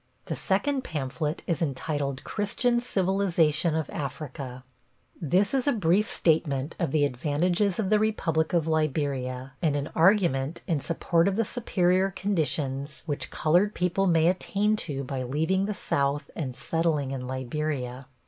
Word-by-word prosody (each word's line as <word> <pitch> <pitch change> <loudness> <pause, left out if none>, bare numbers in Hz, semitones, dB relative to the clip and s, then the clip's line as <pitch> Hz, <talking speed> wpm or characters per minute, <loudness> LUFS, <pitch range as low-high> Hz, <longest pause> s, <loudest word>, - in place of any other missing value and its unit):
The - - -3
second 265 +8 0
pamphlet 150 - -3
is 170 -3 -1
entitled 140 -2 -2
Christian 240 +4 +1
Civilization 180 -7 +1
of 160 -2 -1
Africa. 135 -3 -6 0.6
This 185 - +2
is 270 0 +1
a - - +5
brief 200 0 +2
statement 155 -3 +1
of 170 -5 0
the 145 -1 +3
advantages 170 - 0
of 205 -2 -1
the 215 - +5
Republic 165 -7 0
of 170 -4 +2
Liberia, 140 -5 -1
and 155 -4 +2
an 145 0 -3
argument 165 -5 +2
in 160 -5 0
support 165 +3 +1
of 195 - +1
the 225 +1 +1
superior 190 -5 +1
conditions 150 -7 -2
which 145 -3 -3
colored 180 +7 +2
people 180 +2 +1
may 165 -2 +4
attain 200 +3 +1
to 140 -8 -3
by 135 0 -4
leaving 160 +9 0
the 210 - -2
South 140 -2 -1
and 130 -6 -4
settling 160 -4 0
in 130 -2 -4
Liberia. 130 0 -3
160 Hz, 150 wpm, -27 LUFS, 140-190 Hz, 0.6 s, a